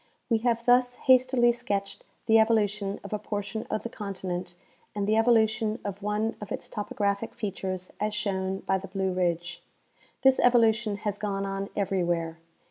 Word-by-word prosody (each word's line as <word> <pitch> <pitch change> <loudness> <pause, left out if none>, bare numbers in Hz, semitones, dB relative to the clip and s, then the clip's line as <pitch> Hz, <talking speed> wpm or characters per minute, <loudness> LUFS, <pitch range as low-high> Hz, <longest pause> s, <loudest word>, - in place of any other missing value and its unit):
We 225 - +4
have 235 0 0
thus 245 0 +4
hastily 255 -2 +4
sketched 200 -4 -3 0.2
the 225 0 +6
evolution 210 -2 +1
of 200 - -7
a 210 - -1
portion 210 +1 -4
of 215 - -2
the 235 - -4
continent 185 -5 -5 0.4
and 205 -1 -1
the 215 +2 +2
evolution 225 -1 +3
of 200 0 -5
one 210 +2 -1
of 210 - -8
its - - -4
topographic 205 0 -2
fea 210 -2 -3
tures 185 -1 -5
as 215 +1 0
shown 195 -2 -2
by 190 0 0
the 195 - -8
Blue 190 0 -1
ridge. 175 -1 -1 0.6
This 265 0 +5
evolution 230 -3 +3
has 205 -1 -1
gone 200 -2 -2
on 195 0 -3
everywhere. 175 -4 -1
205 Hz, 165 wpm, -27 LUFS, 195-225 Hz, 0.6 s, the